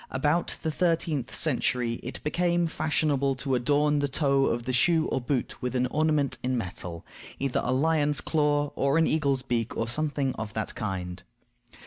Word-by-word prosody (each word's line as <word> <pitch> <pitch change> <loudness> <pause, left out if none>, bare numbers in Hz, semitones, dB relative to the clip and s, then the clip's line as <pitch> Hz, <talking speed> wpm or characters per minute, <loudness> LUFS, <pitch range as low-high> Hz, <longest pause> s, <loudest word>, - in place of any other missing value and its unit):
About 145 +6 0
the 160 - 0
thirteenth 160 -5 0
century 125 -5 0
it 125 - -7
became 175 +2 +1
fashionable 150 -4 0
to 135 +1 -2
adorn 145 +4 +2
the 145 - +1
toe 140 -1 +2
of 120 +1 -1
the 130 - -2
shoe 160 +5 +3
or 130 - -1
boot 125 0 -2
with 125 +1 -2
an 125 0 +2
ornament 155 -3 +1
in 130 0 0
metal; 90 -5 -5 0.3
either 135 -2 0
a 125 - 0
lion's 150 +1 +2
claw, 145 -2 +1
or 140 +2 +2
an 165 - +4
eagle's 140 -5 +1
beak, 120 -3 -2
or 115 - -1
something 145 0 0
of 110 -1 -5
that 110 -1 -2
kind. 90 -3 -4
140 Hz, 170 wpm, -27 LUFS, 125-155 Hz, 0.3 s, an